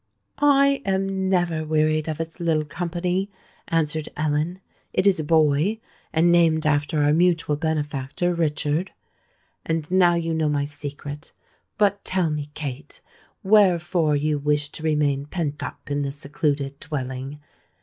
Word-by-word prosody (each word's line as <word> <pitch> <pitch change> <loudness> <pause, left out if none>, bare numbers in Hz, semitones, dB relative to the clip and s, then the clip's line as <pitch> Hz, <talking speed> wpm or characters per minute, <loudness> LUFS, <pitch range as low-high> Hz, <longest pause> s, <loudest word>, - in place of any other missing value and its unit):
"I 280 -1 +4
am 190 -1 -1
never 175 -4 +1
wearied 155 0 +1
of 155 - -4
its 165 +2 -5
little 160 -3 +1
company," 175 +4 -2 0.4
answered 155 -1 -1
Ellen. 155 +4 -1 0.3
"It - - +1
is 195 -4 +4
a - - -1
boy, 155 +6 +2 0.3
and 170 +2 +3
named 165 -2 +3
after 150 +1 +1
our 145 +1 +4
mutual 165 -2 +2
benefactor 150 +1 -1
Richard. 155 +1 0 0.7
And 160 0 -2
now 180 -2 +5
you 165 -1 -1
know 160 -1 +1
my 145 -1 0
secret. 145 +1 -7 0.4
But 200 -1 +2
tell 180 -4 +1
me, 150 -1 -4
Kate, 140 -2 -6 0.4
wherefore 175 -6 +3
you 150 +1 0
wish 150 0 0
to 155 - -8
remain 145 -3 0
pent 150 -4 -3
up - - -7
in 145 0 0
this 140 0 -3
secluded 140 -1 -2
dwelling? 135 -1 -5
155 Hz, 140 wpm, -23 LUFS, 145-175 Hz, 0.7 s, now